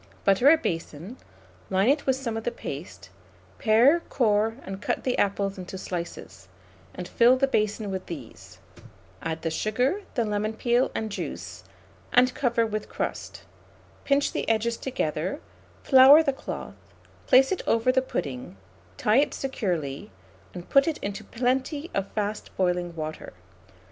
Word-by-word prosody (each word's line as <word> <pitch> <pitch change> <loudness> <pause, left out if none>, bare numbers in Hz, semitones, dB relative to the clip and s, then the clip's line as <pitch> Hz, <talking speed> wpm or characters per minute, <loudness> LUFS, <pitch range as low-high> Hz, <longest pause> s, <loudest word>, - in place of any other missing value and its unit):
Butter 200 +8 +5
a 325 - +7
basin; 170 - -5 0.5
line 190 +3 +2
it 285 +2 +2
with 265 - +3
some 250 -4 -4
of 225 - -4
the - - 0
paste; - - -8 0.5
pare, 240 +8 +5
core, 220 -2 +2
and 195 +1 -7
cut - - -2
the 255 - 0
apples 200 -1 0
into 185 +1 -7
slices, 170 - -7 0.5
and 180 -1 -6
fill 245 +2 +4
the 275 - +3
basin 215 -5 -1
with 190 -1 -5
these; 95 - -10 0.6
add 165 0 -4
the 165 - -1
sugar, 250 - 0
the 235 - +1
lemon 210 +1 -1
peel 240 +3 +1
and 220 -1 -3
juice, - - -6 0.5
and 250 +1 +4
cover 235 -3 +1
with 215 -1 -4
crust; - - -5 0.6
pinch 280 0 +2
the - - -3
edges 225 +1 +1
together, 185 - -3 0.4
flour 270 +4 +8
the 275 - 0
cloth, 270 - -7 0.5
place 265 +1 +6
it 380 - -1
over 230 +2 +3
the 260 +1 +2
pudding, 125 - -5 0.4
tie 215 +3 +2
it 285 - +2
securely, 180 - -3 0.4
and 175 -1 -9
put 275 +2 +4
it 320 - 0
into 200 +1 -4
plenty 260 +7 -2
of 195 0 -2
fast 210 0 -3
boiling 180 -2 0
water. 155 -1 -6
215 Hz, 150 wpm, -26 LUFS, 185-260 Hz, 0.6 s, flour